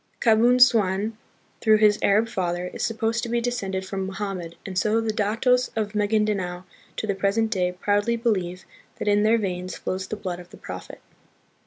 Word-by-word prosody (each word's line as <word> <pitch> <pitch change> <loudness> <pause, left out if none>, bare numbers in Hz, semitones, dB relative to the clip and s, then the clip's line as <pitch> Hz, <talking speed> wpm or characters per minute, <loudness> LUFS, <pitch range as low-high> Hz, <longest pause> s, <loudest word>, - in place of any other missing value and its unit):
Kabun 235 +2 +4
suan, 215 -3 +4 0.5
through 220 -1 +5
his 210 -1 +4
Arab 215 +3 +3
father, 180 -4 -2
is - - -6
supposed 225 +1 0
to 235 - -4
be 235 +1 +1
descended 195 -6 -2
from 190 0 -3
Mohammed, 190 -4 -5
and 190 - -6
so 215 +4 +2
the 225 -1 -1
datos 230 +5 +2
of 215 -1 -2
Magindanao 205 -4 0 0.3
to - - -2
the 200 - 0
present 200 +3 0
day 180 -4 +1
proudly 205 +4 +1
believe 190 -6 -1 0.3
that - - -5
in 205 0 +4
their 220 +2 +4
veins 185 -4 -3
flows 185 0 -4
the 215 - -4
blood 185 -4 -5
of 175 0 -12
the - - -13
Prophet. - - -9
205 Hz, 180 wpm, -24 LUFS, 190-225 Hz, 0.5 s, through